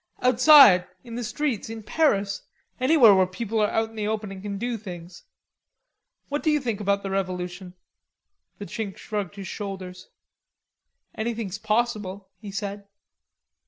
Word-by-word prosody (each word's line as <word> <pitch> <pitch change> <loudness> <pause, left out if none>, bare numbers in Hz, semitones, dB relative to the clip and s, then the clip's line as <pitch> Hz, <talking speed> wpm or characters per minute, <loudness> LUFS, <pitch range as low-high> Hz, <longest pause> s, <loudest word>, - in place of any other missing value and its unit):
"Outside, 250 -7 +7 0.2
in 235 -2 -10
the 240 +1 -4
streets, 250 -2 -2
in 225 -1 -7
Paris, 200 -8 +1 0.4
anywhere 255 -5 +6
where 190 -1 +4
people 220 +4 -3
are 210 -1 +2
out 225 0 -1
in - - -16
the 210 -1 -2
open 215 -2 -3
and 190 -1 -8
can 200 0 -5
do 240 +3 -2
things. 185 - -9 1.0
What 290 +1 -2
do 315 - +1
you 300 -1 +3
think 230 -6 -3
about 200 0 0
the 195 - -4
revolution?" 180 -1 -4 0.8
The 205 - -7
Chink 205 -2 -5
shrugged 205 -3 -4
his 195 -2 -7
shoulders. 190 -3 -7 1.0
"Anything's 220 -3 -4
possible," 210 -3 -1
he 210 - -9
said. 200 0 -5
210 Hz, 150 wpm, -25 LUFS, 195-230 Hz, 1.0 s, Outside